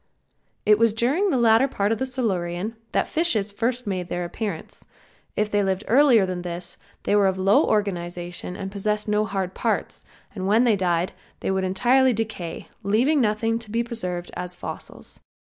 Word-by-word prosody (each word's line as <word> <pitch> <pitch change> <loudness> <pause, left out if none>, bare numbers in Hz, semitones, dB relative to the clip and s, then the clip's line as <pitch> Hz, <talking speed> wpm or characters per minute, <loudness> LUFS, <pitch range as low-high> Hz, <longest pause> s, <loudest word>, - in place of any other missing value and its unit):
It 210 0 +5
was 230 -2 +4
during 275 - +2
the 275 - +2
latter 230 +2 +5
part 205 -5 0
of 225 - 0
the 265 - -1
Silurian 205 -5 -2 0.2
that - - +1
fishes 230 - 0
first 240 +4 -1
made 185 -3 -3
their 175 0 -2
appearance. 185 -1 -5 0.5
If 210 0 0
they 205 - +3
lived 190 0 0
earlier 250 -5 +5
than 185 -1 -3
this 175 0 -5 0.3
they - - +2
were 205 -1 +5
of 190 0 0
low 195 +2 +4
organization 175 -3 -2
and 195 -1 -5
possessed 210 +1 -1
no 210 0 +2
hard 190 -2 -3
parts, - - -2 0.3
and 190 -2 -3
when 220 +4 +4
they 235 -4 +4
died 180 -2 0 0.3
they - - -1
would 190 0 0
entirely 250 +7 +3
decay, 205 -7 -4
leaving 245 +9 +2
nothing 225 +1 +1
to 230 -2 -12
be 230 +2 0
preserved 180 -7 -4
as 180 0 -4
fossils. - - -7
210 Hz, 175 wpm, -24 LUFS, 185-230 Hz, 0.5 s, It